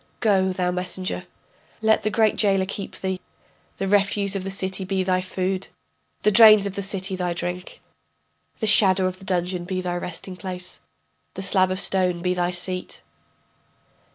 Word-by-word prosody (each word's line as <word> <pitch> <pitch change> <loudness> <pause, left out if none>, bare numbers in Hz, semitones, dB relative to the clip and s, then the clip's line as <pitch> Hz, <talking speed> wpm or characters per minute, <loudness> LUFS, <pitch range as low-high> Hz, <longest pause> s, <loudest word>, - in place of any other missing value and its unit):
Go, 190 -4 +2
thou 180 -1 -1
messenger, 180 - -3 0.5
Let 220 0 +3
the 215 - 0
great 215 0 +2
jailer 195 -3 +2
keep 195 +1 -6
thee, 190 -1 -2 0.6
The 195 - -2
refuse 200 0 +2
of 195 - -3
the 195 - -4
city 190 0 -1
be 190 0 -1
thy 185 0 +1
food, 185 +1 -3 0.6
The 210 - +4
drains 215 -1 +8
of 200 - -3
the 200 - -4
city 195 0 -2
thy 180 -1 -2
drink, 180 +1 -6 0.8
The 220 - -1
shadow 195 -3 +4
of 185 0 -3
the 190 - -12
dungeon 180 -1 -1
be 185 +1 -3
thy 180 -1 -2
resting 180 +1 -6
place, 180 -1 -6 0.6
The 190 - -5
slab 185 -1 +2
of 185 0 -2
stone 180 -3 +2
be 180 0 +1
thy 175 -1 0
seat. 180 +1 -3
190 Hz, 170 wpm, -23 LUFS, 180-195 Hz, 0.8 s, drains